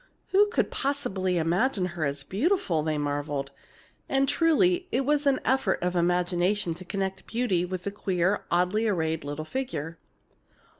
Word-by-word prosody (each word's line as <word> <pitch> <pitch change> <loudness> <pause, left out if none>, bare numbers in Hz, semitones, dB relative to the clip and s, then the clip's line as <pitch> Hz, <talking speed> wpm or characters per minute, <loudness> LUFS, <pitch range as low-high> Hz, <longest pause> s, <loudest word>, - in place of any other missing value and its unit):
"Who 410 +2 +5
could 420 - 0
possibly 195 -10 -1
imagine 180 +6 +1
her 165 -4 -1
as 140 0 -3
beautiful!" 200 - +1
they 155 0 -1
marveled. 145 -1 -2 0.6
And 275 0 +2
truly, 350 +4 +3
it 265 +1 +1
was 295 0 +2
an 275 -1 +3
effort 265 +1 +2
of 180 0 0
imagination 175 +2 +1
to 175 +3 -10
connect 190 +1 -3
beauty 225 -7 0
with 185 0 -5
the 200 - -3
queer, 190 -1 0
oddly 180 +6 +2
arrayed 160 -6 0
little 145 +2 -5
figure. 165 - -4
185 Hz, 150 wpm, -27 LUFS, 165-265 Hz, 0.6 s, Who